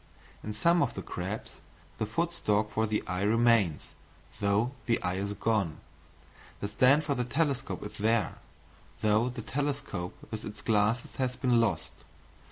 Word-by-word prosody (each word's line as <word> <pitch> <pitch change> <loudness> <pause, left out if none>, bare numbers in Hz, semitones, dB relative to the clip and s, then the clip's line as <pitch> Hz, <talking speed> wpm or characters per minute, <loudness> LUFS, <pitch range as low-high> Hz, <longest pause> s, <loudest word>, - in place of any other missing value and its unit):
In 105 - -4
some 170 +11 +3
of 135 - 0
the - - -5
crabs - - -5 0.4
the 110 - 0
foot 170 +10 -1
stalk 105 -9 +1
for 110 +1 +1
the 105 0 0
eye 90 +1 -2
remains, 110 -5 +3 0.5
though 100 +4 +2 0.2
the 115 - +3
eye 90 0 0
is 100 +1 -2
gone; 100 -7 0 0.8
the 100 - -2
stand 130 +8 +4
for 145 - 0
the 125 - 0
telescope 140 +1 -1
is 105 - -8
there, 110 +1 +1 0.6
though 110 +3 +3
the 120 -2 -6
telescope 140 -11 -3
with 110 -1 -4
its 105 - -8
glasses 110 +3 +1
has 130 -1 0
been 125 -2 +3
lost. 80 -8 0
110 Hz, 160 wpm, -30 LUFS, 105-125 Hz, 0.8 s, stand